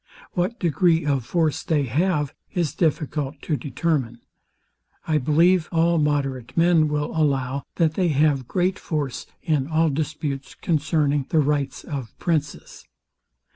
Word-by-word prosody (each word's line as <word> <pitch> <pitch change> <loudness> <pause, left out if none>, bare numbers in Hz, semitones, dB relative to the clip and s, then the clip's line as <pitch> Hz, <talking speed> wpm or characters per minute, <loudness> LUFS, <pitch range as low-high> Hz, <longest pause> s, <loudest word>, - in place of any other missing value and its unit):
What 185 +7 -1
degree 170 -1 +2
of 135 -5 0
force 160 -4 +1
they 155 -4 +1
have 150 +2 0 0.2
is 165 -6 0
difficult 150 -3 -1
to 155 - 0
determine. 135 -4 -2 0.9
I 155 -1 +2
believe 165 +5 +3
all 170 0 +3
moderate 140 -4 -1
men 165 -2 +4
will 150 +1 -2
allow, 140 -3 0
that 160 -2 +2
they 180 +1 +1
have 145 -4 +2
great 185 +1 0
force 145 -5 -3 0.2
in 150 -5 0
all 160 0 +2
disputes 145 -2 -3
concerning 150 -3 0
the 160 - +1
rights 145 -2 0
of 135 -7 -6
princes. 150 -4 -3
150 Hz, 135 wpm, -23 LUFS, 140-165 Hz, 0.9 s, men